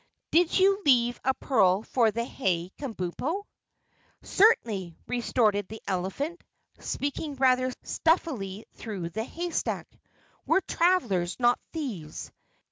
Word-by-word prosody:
Did 345 Hz, 0 st, +4 dB
you 390 Hz, +1 st, +4 dB
leave 245 Hz, -4 st, +3 dB
a 265 Hz, 0 st, +2 dB
pearl 195 Hz, -6 st, +3 dB
for 235 Hz, -2 st, +2 dB
the 230 Hz, +2 st, -2 dB
hay, 180 Hz, -8 st, -1 dB
Kabumpo?" 270 Hz, -, -3 dB, 0.8 s
"Certainly," 210 Hz, -, +2 dB
retorted 220 Hz, -5 st, +1 dB
the 220 Hz, +1 st, -8 dB
elephant, 195 Hz, -, -3 dB, 0.4 s
speaking 285 Hz, +1 st, -3 dB
rather 255 Hz, -1 st, +3 dB
stuffily 235 Hz, -, 0 dB
through 195 Hz, -7 st, -5 dB
the 220 Hz, +5 st, -2 dB
haystack. 340 Hz, +7 st, -3 dB, 0.6 s
"We're 385 Hz, -, +4 dB
travelers, 240 Hz, -, +1 dB
not 240 Hz, 0 st, +4 dB
thieves. 220 Hz, -, -5 dB
240 Hz, 110 wpm, -28 LUFS, 195-310 Hz, 0.8 s, Did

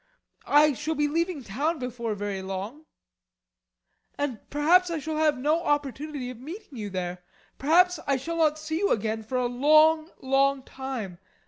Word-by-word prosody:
I 295 Hz, 0 st, +5 dB
shall 305 Hz, +4 st, -3 dB
be 295 Hz, 0 st, +1 dB
leaving 330 Hz, -1 st, -1 dB
town 285 Hz, +11 st, -1 dB
before 235 Hz, -4 st, -4 dB
very 200 Hz, -1 st, -4 dB
long, 195 Hz, +11 st, -6 dB, 1.3 s
and 275 Hz, -6 st, -2 dB
perhaps 345 Hz, +5 st, +4 dB
I 335 Hz, -, -2 dB
shall 310 Hz, +1 st, -4 dB
have 305 Hz, -3 st, +2 dB
no 305 Hz, +6 st, +1 dB
opportunity 290 Hz, -2 st, -2 dB
of 245 Hz, -, -11 dB
meeting 330 Hz, -, -9 dB
you 205 Hz, -1 st, -4 dB
there. 180 Hz, -1 st, -4 dB, 0.4 s
Perhaps 360 Hz, +5 st, +4 dB
I 275 Hz, -1 st, +2 dB
shall 335 Hz, +6 st, -4 dB
not 310 Hz, -2 st, +3 dB
see 315 Hz, +1 st, -3 dB
you 400 Hz, -, +1 dB
again 220 Hz, +1 st, 0 dB
for 225 Hz, +4 st, -3 dB
a 250 Hz, -, +1 dB
long, 310 Hz, +6 st, +4 dB
long 270 Hz, 0 st, +2 dB
time. 255 Hz, -11 st, -6 dB
285 Hz, 160 wpm, -26 LUFS, 245-315 Hz, 1.3 s, I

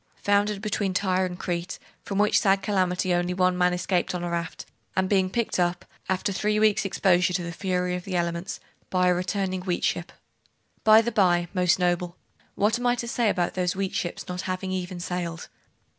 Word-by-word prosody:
'Foundered 205 Hz, 0 st, +1 dB
between 200 Hz, -3 st, -1 dB
Tyre 185 Hz, -1 st, +1 dB
and 180 Hz, -1 st, -7 dB
Crete, 175 Hz, 0 st, -3 dB, 0.2 s
from 200 Hz, -, -4 dB
which 210 Hz, +1 st, +4 dB
sad 195 Hz, -2 st, +2 dB
calamity 185 Hz, -3 st, +1 dB
only 175 Hz, +1 st, 0 dB
one 185 Hz, 0 st, +2 dB
man 180 Hz, 0 st, +3 dB
escaped 180 Hz, 0 st, 0 dB
on 175 Hz, -, -3 dB
a 175 Hz, -, -3 dB
raft, 170 Hz, 0 st, -4 dB, 0.3 s
and 190 Hz, 0 st, +2 dB
being 190 Hz, -1 st, +2 dB
picked 235 Hz, +3 st, -2 dB
tip, 175 Hz, 0 st, 0 dB, 0.2 s
after 190 Hz, +1 st, 0 dB
three 210 Hz, +2 st, 0 dB
weeks' 215 Hz, -2 st, +3 dB
exposure 180 Hz, -2 st, +2 dB
to 180 Hz, -1 st, -1 dB
the 170 Hz, -, -4 dB
fury 180 Hz, 0 st, -1 dB
of 180 Hz, -, -5 dB
the 185 Hz, -1 st, -4 dB
elements, 170 Hz, +1 st, -2 dB, 0.3 s
by 180 Hz, -1 st, +2 dB
a -, -, +4 dB
returning 185 Hz, +1 st, -2 dB
wheat 180 Hz, -1 st, -2 dB
ship 175 Hz, +1 st, -1 dB, 0.7 s
By 220 Hz, 0 st, +7 dB
the 235 Hz, -, -1 dB
bye, 175 Hz, -5 st, +2 dB
most 180 Hz, -2 st, +3 dB
noble, 175 Hz, -1 st, 0 dB, 0.4 s
what 215 Hz, +4 st, +2 dB
am 245 Hz, -, 0 dB
I 245 Hz, -, +3 dB
to 240 Hz, -1 st, -4 dB
say 235 Hz, -2 st, +1 dB
about 175 Hz, -3 st, 0 dB
those 180 Hz, -1 st, -1 dB
wheat 195 Hz, 0 st, -2 dB
ships 175 Hz, -, -3 dB
not 180 Hz, 0 st, -4 dB
having 185 Hz, +1 st, -3 dB
even 185 Hz, -1 st, -4 dB
sailed? 175 Hz, -2 st, -4 dB
185 Hz, 200 wpm, -26 LUFS, 180-200 Hz, 0.7 s, By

